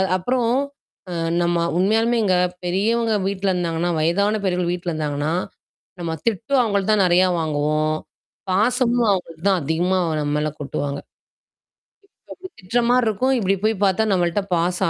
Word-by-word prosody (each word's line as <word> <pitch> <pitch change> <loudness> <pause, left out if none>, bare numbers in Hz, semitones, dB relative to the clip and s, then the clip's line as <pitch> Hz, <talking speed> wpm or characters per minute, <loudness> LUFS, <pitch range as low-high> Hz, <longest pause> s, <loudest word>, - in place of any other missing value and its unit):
அது 190 - +1
அப்புறம் 240 +4 0 0.6
அ - - -5 0.3
நம்ம 170 0 +1 0.2
உண்மையாலுமேங்க 220 0 +2 0.3
பெரியவங்க 220 +5 +1 0.2
வீட்ல 195 -1 -1
இருந்தாங்கன்னா. 170 0 -1
வயதான 200 +6 +1
பெரியவர்கள் 180 -2 0
வீட்ல 175 0 -4
இருந்தாங்கன்னா. 150 -1 -2 0.7
நம்ம 165 -1 -3
திட்டும் 250 +5 +1
அவங்கள்ட்ட 200 -2 0
தான் 205 -2 +3
நிறையா 180 +1 +4
வாங்குவோம், 155 0 0 0.6
பாசமும் 240 +3 +2
அவங்க 175 -3 -3
தான் 190 -3 +2
அதிகமா 175 +5 0 0.2
நம்ம 145 0 -2
மேல 155 0 -1
கொட்டுவாங்க. 140 0 -3 1.3
அப்படி 370 - -9
திட்டுற 225 +6 0
மாரி 250 -1 +3
இருக்கும். 255 +6 +1
இப்டி 195 -1 +1
போய் 220 - +2
பார்த்தா 195 +3 +2
நம்மள்ட்ட 180 +2 +1
பாசம் 175 0 0
185 Hz, 135 wpm, -21 LUFS, 170-220 Hz, 1.3 s, நிறையா